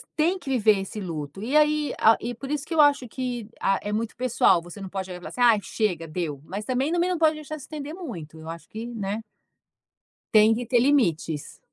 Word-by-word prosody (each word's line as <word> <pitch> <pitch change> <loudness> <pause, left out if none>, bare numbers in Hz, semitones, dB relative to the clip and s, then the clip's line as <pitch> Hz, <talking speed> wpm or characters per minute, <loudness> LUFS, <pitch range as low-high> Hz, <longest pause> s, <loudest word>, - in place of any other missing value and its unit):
tem 340 +5 +2
que 275 - -8
viver 215 -5 +4
esse 200 +2 -6
luto. 160 +1 -5
E 275 +6 +2
aí 300 0 +3
a 220 +1 +6
e 240 +1 -3
por 270 +4 -8
isso 300 -1 -2
que 330 - -5
eu 320 - 0
acho 280 -4 +4
que, 245 -2 -4
ah, 195 -1 +2
é 205 - -3
muito 220 +1 -2
pessoal, 230 -8 +3
você 175 +3 -11
não 190 - -5
pode 190 -1 -5
falar 180 0 -8
assim: 250 - -6
"Ai, 230 -3 +6
chega, 180 -8 -1
deu." 155 -4 -4
Mas 205 +2 -5
também 260 +5 0
não 350 +1 +1
pode 315 -1 +3
deixar 305 0 -7
se - - -10
estender 300 0 -6
muito. 180 - -8
Eu 160 +1 -9
acho 165 -1 -8
que 225 +2 -6
Né? 215 -2 -3 1.1
Tem 215 0 +7
que 240 +2 -3
ter 245 +1 +3
limites. 175 - +1
225 Hz, 220 wpm, -25 LUFS, 190-285 Hz, 1.1 s, Tem